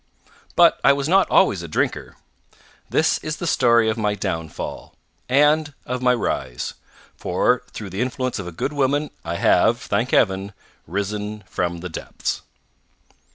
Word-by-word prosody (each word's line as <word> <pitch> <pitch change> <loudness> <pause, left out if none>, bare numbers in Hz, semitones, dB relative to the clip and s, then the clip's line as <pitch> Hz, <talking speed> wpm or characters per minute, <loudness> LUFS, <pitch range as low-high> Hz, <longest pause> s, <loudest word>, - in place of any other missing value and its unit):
But - - +5
I 140 - +7
was 140 0 -2
not 190 +3 +4
always 100 - +4
a 85 - -6
drinker. 75 - -2 0.7
This - - +2
is - - -4
the - - -4
story 115 -2 +4
of 110 +1 0
my 105 -1 +1
downfall 80 -5 -5 0.3
and 150 +2 +3
of 125 0 -3
my 125 -1 +4
rise 65 - -3 0.4
for - - +1
through 100 -3 -8
the 95 +5 -3
influence 130 -1 -2
of 95 - -5
a - - -5
good 135 - -3
woman, 145 +1 0
I 85 +1 -3
have, - - +3
thank - - -1
Heaven, 95 +1 +2 0.3
risen 105 +3 -3
from 85 -2 -2
the 90 - -5
depths. 80 - -4
105 Hz, 155 wpm, -22 LUFS, 95-135 Hz, 0.7 s, I